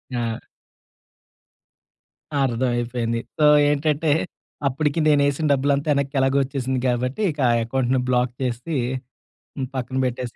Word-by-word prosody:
ఆ! 115 -2 -3 2.0
అర్థ‌మైపోయింది. 120 -2 -1 0.2
సో 150 - +4 0.2
ఏంటంటే 150 +1 +1 0.6
అప్పటికి 150 +3 0
నే‌నేసిన 145 0 +2
డబ్బులంతా 140 +1 +1
వెనక్కి 140 0 -2
ఎలాగో 135 +1 +2
వచ్చేసింది 130 -1 -2
కాబట్టి 125 - -1
ఇక 150 - -12
ఆ - - +4
అకౌంట్‌ని 130 +1 0
బ్లాక్ 125 -1 +1
చేసి, 125 +5 -2 1.0
పక్కన 130 0 -3
పెట్టేసి 125 -1 -4
130 Hz, 105 wpm, -22 LUFS, 125-140 Hz, 2.0 s, సో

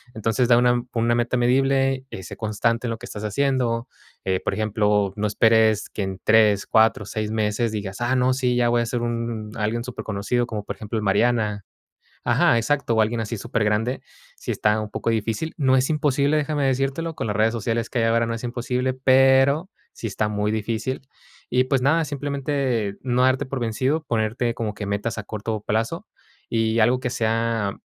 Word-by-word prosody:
Entonces, 115 +3 +1
da 120 -1 +5
una 120 0 +3
con 115 -1 -1
una 120 - +2
meta 120 +1 0
medible 135 +1 +2
y 95 - -8
sé - - -8
constante 115 +2 -1
en - - -2
lo 115 - -3
que - - -10
estás 105 0 -7
haciendo. 120 0 0 0.4
Eh, 95 -1 +1
por - - -1
ejemplo, 105 -2 +1
no 105 0 -1
esperes 110 0 +3
que 105 - -4
en 95 -1 -5
3 105 -2 +4
4 110 -2 +3
6 105 +1 -3
meses 110 +1 0
digas: 105 0 -5
"Ah, 125 +2 +1
no, 125 0 +3
sí, 125 -1 0
ya 120 -1 +2
voy 120 0 +2
a - - 0
ser 120 0 -2
un 115 -2 -3
alguien 110 +2 -1
superconocido", 120 0 -2
como 110 -3 -4
por - - -6
ejemplo, 110 +1 -5
El 105 - -2
Mariana 105 -1 +1 0.6
Ajá, 115 - +4
exacto, 120 +1 0
o 110 - +4
alguien 115 +2 0
así 115 +1 -3
supergrande, 110 +4 0 0.4
sí - - -4
está 105 +1 +1
un 110 - -5
poco 115 - -3
difícil. 115 +8 -1
No 130 -3 +3
es 130 0 +2
imposible, 150 -1 +2
déjame 145 -1 0
decírtelo, 135 +5 -1
con - - -3
las 105 - -2
redes 110 +1 +3
sociales 115 0 -2
que 125 - -1
hay 115 - +2
ahora 115 +1 +2
no 115 - -2
es 115 +2 -5
imposible, 125 +1 -1
pero 135 +5 +4 0.2
sí 115 - -6
está 105 +1 -1
muy 105 0 -1
difícil. 110 +4 -2 0.5
Y, 125 +1 +2
pues, 130 -1 +1
nada, 160 +4 +3
simplemente, 140 -6 -2
no 125 0 +1
darte 130 +2 +2
por 130 0 -4
vencido, 130 +7 0
ponerte 115 0 -1
como 110 -2 -3
que 105 - -6
metas 100 +3 -2
a 110 - -4
corto 110 0 -4
plazo 110 +2 -1 0.4
y 115 0 +1
algo 125 +3 +3
que 125 - -1
sea 115 -3 -1
115 Hz, 200 wpm, -23 LUFS, 110-130 Hz, 0.6 s, da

